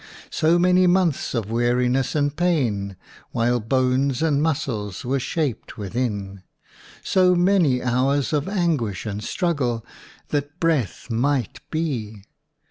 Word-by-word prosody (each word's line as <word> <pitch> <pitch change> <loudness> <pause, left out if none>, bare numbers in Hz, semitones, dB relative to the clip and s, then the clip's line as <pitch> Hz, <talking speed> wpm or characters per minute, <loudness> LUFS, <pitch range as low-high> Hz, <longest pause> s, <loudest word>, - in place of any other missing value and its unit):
So 165 +2 +3
many 180 +1 +4
months 175 -7 +1
of 110 -2 -2
weariness 125 +3 +1
and 145 -1 +1
pain 120 - 0 0.4
while 120 +1 +1
bones 130 +4 +1
and 145 -3 +2
muscles 135 - -2
were 135 +2 0
shaped 140 -3 -3
within! 100 -2 -3 0.6
So 185 -1 +4
many 175 -8 +3
hours 130 +4 +1
of 150 +4 0
anguish 155 - -1
and 105 0 -4
struggle 125 - -1 0.4
that 145 +2 -3
breath 140 - 0
might 125 0 0
be! 120 -11 -3
135 Hz, 120 wpm, -23 LUFS, 115-160 Hz, 0.6 s, many